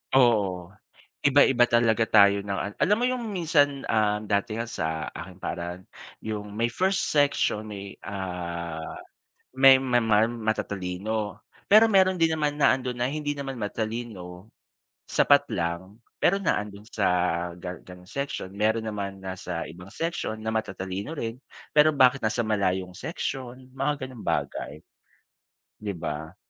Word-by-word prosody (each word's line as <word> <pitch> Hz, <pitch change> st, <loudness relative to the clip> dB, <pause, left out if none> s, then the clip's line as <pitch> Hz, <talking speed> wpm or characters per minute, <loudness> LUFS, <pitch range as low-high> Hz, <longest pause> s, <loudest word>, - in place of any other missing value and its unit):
Oo. 100 Hz, -8 st, +3 dB, 0.5 s
Iba-iba 135 Hz, -3 st, +5 dB
talaga 115 Hz, -1 st, +3 dB
tayo 100 Hz, -1 st, +6 dB
ng 100 Hz, 0 st, -3 dB
an 100 Hz, -, -3 dB
alam 205 Hz, +2 st, +4 dB
mo 240 Hz, -, -2 dB
'yong 250 Hz, -1 st, 0 dB
minsan, 150 Hz, -8 st, +2 dB
ah, 105 Hz, -1 st, +2 dB
dati 105 Hz, +1 st, -1 dB
nga 115 Hz, -, -2 dB
sa 80 Hz, -5 st, -3 dB
aking -, -, -9 dB
paaralan 90 Hz, +2 st, -4 dB, 0.4 s
'yong 105 Hz, -1 st, -4 dB
may 115 Hz, +1 st, 0 dB
first 190 Hz, +7 st, +1 dB
section, 140 Hz, -7 st, +2 dB
may, 100 Hz, -1 st, -7 dB
ah, 85 Hz, -4 st, -5 dB, 0.6 s
may 135 Hz, 0 st, +8 dB
ma 125 Hz, -2 st, +1 dB
ma 110 Hz, 0 st, +4 dB
matatalino. 110 Hz, -2 st, -3 dB, 0.3 s
Pero 215 Hz, +2 st, +8 dB
meron 190 Hz, -3 st, +4 dB
din 165 Hz, -1 st, +3 dB
naman 150 Hz, -1 st, -1 dB
na 140 Hz, -, +5 dB
ando'n 125 Hz, -2 st, -4 dB
na 120 Hz, -, +1 dB
hindi 145 Hz, +1 st, -3 dB
naman 135 Hz, -1 st, -4 dB
matalino, 110 Hz, -3 st, -5 dB, 0.6 s
sapat -, -, +4 dB
lang 85 Hz, +5 st, -3 dB, 0.2 s
pero 195 Hz, +3 st, +4 dB
na 195 Hz, -, +1 dB
ando'n 105 Hz, +1 st, -8 dB
sa 105 Hz, -3 st, 0 dB, 0.5 s
gan 90 Hz, -2 st, -7 dB
ganong 90 Hz, 0 st, -13 dB
section. 140 Hz, -3 st, -4 dB
Meron 110 Hz, +2 st, +1 dB
naman 100 Hz, -2 st, -4 dB
nasa 90 Hz, -2 st, -4 dB
ibang 90 Hz, +4 st, -11 dB
section 165 Hz, -9 st, -3 dB
na 110 Hz, 0 st, -3 dB
matatalino 95 Hz, +2 st, -3 dB
rin, 115 Hz, -4 st, -4 dB, 0.4 s
pero 150 Hz, +1 st, +7 dB
bakit 130 Hz, -1 st, +5 dB
nasa 110 Hz, +2 st, 0 dB
malayong 95 Hz, -4 st, 0 dB
section, 130 Hz, -, -5 dB
mga 135 Hz, 0 st, -1 dB
ganong 125 Hz, -4 st, -11 dB
bagay. -, -, -2 dB, 1.0 s
'Di 105 Hz, -1 st, -3 dB
ba? 80 Hz, 0 st, -5 dB
110 Hz, 145 wpm, -26 LUFS, 95-135 Hz, 1.0 s, may